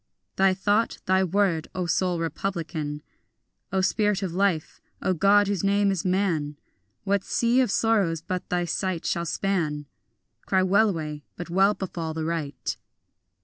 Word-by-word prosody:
Thy 190 -1 +3
thought, 205 +4 +1
thy 190 +1 +3
word, 185 -3 +1
O 185 -1 -1
soul 175 +2 +1
republican, 165 -4 -3 0.7
O 190 0 +1
spirit 205 +1 +1
of 180 -3 -3
life, 185 -4 0 0.2
O 185 - 0
God 200 +3 +4
whose 200 -2 -1
name 200 0 +3
is 190 -4 -2
man: 175 -6 0 0.5
What 200 -1 +1
sea 240 +2 +2
of 255 - +1
sorrows 200 -6 +2
but 180 +3 -5
thy 175 -1 0
sight 180 0 -2
shall 170 -1 -1
span? 155 -6 -1 0.6
Cry 190 -1 +3
wellaway, 180 -7 +1
but 175 -1 -7
well 195 +3 +4
befall 165 -4 -4
the 160 -1 -2
right. 150 -6 -3
185 Hz, 145 wpm, -25 LUFS, 165-200 Hz, 0.7 s, God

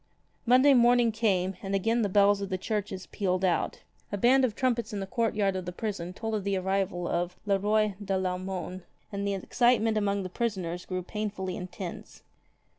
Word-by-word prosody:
Monday 255 +4 +6
morning 240 -1 +5
came, 195 -4 0
and 195 0 -2
again 225 +5 +1
the 205 - +1
bells 200 +1 +4
of 200 - -3
the 185 - -1
churches 200 -2 -3
pealed 185 -2 -1
out. 180 - 0 0.3
A 205 - -1
band 255 +6 +4
of 230 -5 +1
trumpets 240 -3 0
in 205 - -2
the 195 - -3
courtyard 210 -3 0
of 185 -1 -3
the 180 - -4
prison 180 -3 -4
told 220 +4 -4
of 210 -2 -1
the 200 -1 0
arrival 185 -2 -1
of 175 +1 -1
Le 200 -1 +2
Roy 210 +1 +2
de 195 -1 -1
VAumone, 185 0 -3 0.3
and 200 0 -2
the 200 - 0
excitement 225 +2 +2
among 200 -1 0
the - - -3
prisoners 180 -4 -3
grew 185 -1 -3
painfully 195 -2 -4
intense. 180 0 -8
200 Hz, 190 wpm, -28 LUFS, 185-220 Hz, 0.3 s, Monday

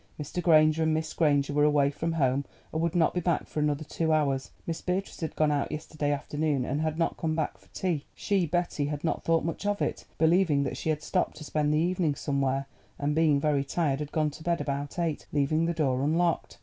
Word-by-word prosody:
Mr. 150 +4 -3
Granger 155 -2 +5
and 160 -1 +2
Miss 160 0 -2
Granger 145 -3 +2
were 145 0 +3
away 145 -2 +4
from 165 +3 -2
home, 135 -3 +1 0.3
and 160 - 0
would 170 +1 0
not 165 -3 +3
be 180 - 0
back 175 -2 0
for - - -4
another 150 0 0
two 160 +1 -1
hours. 140 -4 +1 0.2
Miss 165 -1 -3
Beatrice 185 +2 -2
had 160 - -3
gone 155 -1 +2
out 145 -1 0
yesterday 150 -1 -3
afternoon, 145 -1 -1
and 140 +4 -1
had 155 0 -1
not 165 - 0
come 160 -1 -1
back 150 -11 -2
to 100 - -23
tea. 170 -6 -2
She, 195 -4 0
Betty, 170 -3 0
had 150 0 -4
not 165 - -1
thought 165 -1 +2
much 165 - -3
of 205 0 0
it, - - -2
believing 160 -3 +3
that 135 - -3
she - - -3
had 155 -1 -1
stopped - - -1
to 155 - -8
spend 150 0 0
the 150 - +2
evening 170 -2 +1
somewhere, 135 -1 0 0.3
and, 145 +1 0
being 155 -2 +3
very 145 -1 +1
tired, 140 -1 0
had 150 -1 -5
gone 155 -1 +1
to 150 - -12
bed 170 0 +1
about 140 +2 -3
eight, 165 -4 -2
leaving 155 +3 +1
the 170 - +1
door 135 -5 +1
unlocked. 165 +4 0
155 Hz, 230 wpm, -28 LUFS, 145-165 Hz, 0.3 s, Granger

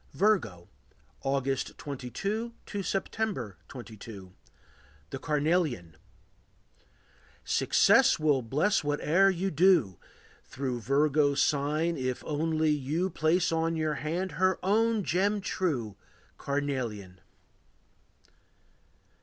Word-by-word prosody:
Virgo. 110 - +1 0.5
August 135 -1 -1
22 195 - -4
to 205 - -4
September 195 - -3
22. 110 -6 -10 0.8
The - - -5
Carnelian. 150 - 0 1.5
Success - - +4
will 150 -4 +2
bless 150 - +1
whate'er 150 +6 +3
you 190 +1 -1
do, 155 - +3 0.4
Through 130 -2 -4
Virgo's 145 +3 +2
sign, 150 +3 0
if 130 -1 -3
only 155 +1 0
you 150 +6 -1
Place 165 +3 +1
on 165 0 0
your 155 -1 0
hand 165 +6 -3
her 185 0 +3
own 220 +2 +2
gem 200 +5 +1
true, 140 - -2 0.4
Carnelian. 120 -10 -3
150 Hz, 90 wpm, -29 LUFS, 130-185 Hz, 1.5 s, Success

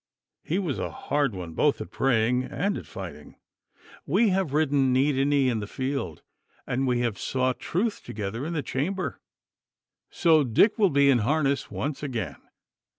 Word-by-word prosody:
He 170 - -1
was 175 -8 -2
a - - -2
hard 140 -6 -1
one 85 -3 -6
both 145 - +2
at - - -7
praying 125 0 +2
and 200 +2 -1
at - - -7
fighting. - - -9 0.7
We 230 -2 +3
have 190 -5 0
ridden 140 -3 +2
knee 135 +3 +3
to 135 -1 +1
knee 140 -2 +3
in 120 -3 +1
the 105 - -5
field, 130 - -4 0.4
and 130 +2 -1
we 120 -1 +1
have 115 -5 -1
sought 130 -1 0
truth 210 +5 -1
together 105 +4 -5
in 165 +3 -3
the 150 -4 -2
chamber. 180 +10 -3 0.9
So, 160 -3 +4
Dick 140 - +3
will 200 -3 +5
be 140 -1 +4
in 125 - +4
harness 140 +4 +1
once 145 0 -3
again! 130 -6 -4
135 Hz, 170 wpm, -26 LUFS, 125-155 Hz, 0.9 s, will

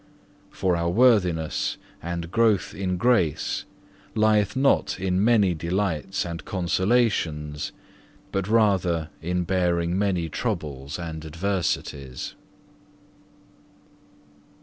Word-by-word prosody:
For 90 -2 0
our 85 0 0
worthiness 90 -8 +2 0.2
and 85 0 -4
growth 115 -3 +2
in 90 -2 -2
grace 90 - +1 0.5
lieth 110 -1 +3
not 135 -6 +2
in 95 +1 +1
many 105 -5 +4
delights 90 +2 -1
and 85 -2 -5
consolations, 90 -6 0 0.6
but 95 -1 -1
rather 95 -8 +2
in 90 +2 -1
bearing 85 -1 +1
many 95 -4 +1
troubles 75 - -3
and 80 -3 -6
adversities. 80 -6 -3
90 Hz, 90 wpm, -25 LUFS, 80-100 Hz, 0.6 s, many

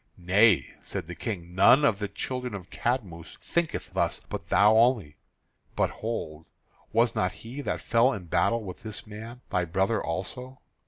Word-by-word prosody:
"Nay," 95 +3 +4
said - - -5
the 90 - -7
King, 90 -2 -5
"none 125 +10 +6
of 105 -8 +2
the 105 - -2
children 125 +3 -4
of 95 -2 -9
Cadmus 100 -10 -3
thinketh 170 -2 -2
thus, - - 0
but - - -6
thou 105 +2 +5
only. 110 - +3 0.6
But, - - +1
hold, 80 -9 -5 0.4
was 115 +1 +3
not 90 - 0
he 130 +5 -6
that - - -3
fell 120 +3 +3
in 100 -4 -5
battle 110 +7 +1
with 95 -3 -8
this 110 -1 -6
man 110 +3 -9
thy 90 -3 +1
brother 95 +6 0
also?" 125 +10 -5
105 Hz, 165 wpm, -27 LUFS, 90-120 Hz, 0.6 s, none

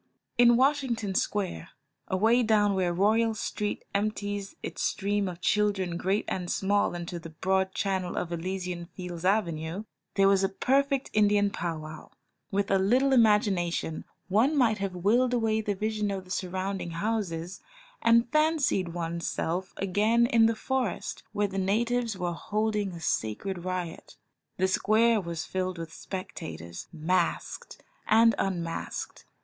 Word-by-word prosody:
In 240 -1 +6
Washington 260 -7 +1
Square, 190 -3 -1 0.4
away 220 +6 +3
down 210 -3 +3
where 185 -2 +1
Royal 220 +5 +2
Street 210 -1 -3
empties 205 -1 -2
its - - -5
stream 205 0 0
of 180 -1 -6
children 200 -4 +1
great 190 +4 0
and 180 -2 -3
small 200 -2 +1
into 175 0 -5
the 165 0 -9
broad 190 +4 0
channel 190 -3 -1
of 170 - -2
Elysian 180 0 -4
Fields 180 -2 -7
Avenue, 180 -2 0 0.3
there 195 -1 +5
was 195 0 +4
a 195 - +2
perfect 275 +6 +1
Indian 205 -1 +3
pow 170 -4 -3
wow. 155 0 -9 0.4
With 200 0 0
a 195 - +4
little 255 +8 +3
imagination 205 -8 +2 0.2
one 230 +11 +3
might 230 -5 +3
have 195 -2 -3
willed 240 +7 +2
away 220 -2 +1
the 205 -2 -2
vision 215 +1 -1
of 195 -2 -4
the 185 - -12
surrounding 190 0 -3
houses, 190 -4 -2 0.4
and 230 +1 +5
fancied 305 - +2
one's 170 0 -3
self 180 +3 -2
again 215 +5 +2
in 230 -2 +5
the 225 - +1
forest, 255 -2 -2
where 205 0 0
the 195 0 -3
natives 230 +3 0
were 175 -1 -2
holding 210 +1 -1
a 170 - -7
sacred 165 - -2
riot. 180 -2 -5 0.4
The 190 - +2
square 220 +3 +3
was 170 -3 -4
filled 185 -1 -2
with 165 -1 -7
spectators, 165 - -7
masked 170 +2 -2 0.2
and 225 +1 +6
un 185 -3 0
masked. 165 0 -5
195 Hz, 145 wpm, -28 LUFS, 180-220 Hz, 0.4 s, In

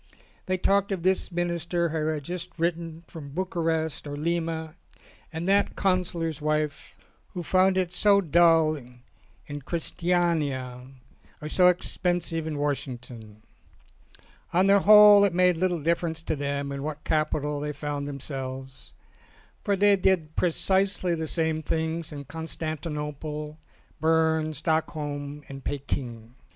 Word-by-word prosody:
They 185 0 +1
talked 200 +2 +2
of 185 -4 -2
this 190 +1 +2
Minister 170 0 -1
who 155 -1 -1
had 155 -2 -2
just 180 +3 -5
written 165 -1 -2
from 155 -4 -10
Bucharest 165 -4 -1
or 145 - -5
Lima, 160 0 -2 0.6
and 165 +2 -4
that 200 +1 +2
Counsellor's 175 -5 -1
wife 155 0 -2 0.4
who 175 - -3
found 185 +3 +3
it 180 -2 0
so 200 +1 +4
dull 165 -3 +4 0.7
in 145 0 -7
Christiania 155 -6 -1 0.5
or 150 - -6
so 180 +4 +4
expensive 175 -2 0
in 155 -2 -3
Washington. 125 -6 -5 1.1
On 185 +2 +3
the 200 +1 +6
whole 210 0 +8
it 195 -4 +2
made 180 0 +4
little 180 0 0
difference 165 0 0
to 160 - -1
them 140 0 -3
in 140 0 -4
what 150 +1 -5
capital 150 -1 0
they 150 +1 -3
found 145 -1 -4
themselves, 135 -2 -7 0.7
for 200 - +1
they 200 +1 +5
did 180 -5 +1
pre 180 - +2
cisely 190 +1 +1
the 160 -1 -3
same 160 -1 -1
things 160 +1 -2
in 145 -1 -7
Constantinople, 150 -1 -5 0.4
Berne, 160 -1 +2
Stockholm 150 -2 -2
and 135 -1 -9
Peking. 125 -5 -4
160 Hz, 130 wpm, -26 LUFS, 150-175 Hz, 1.1 s, whole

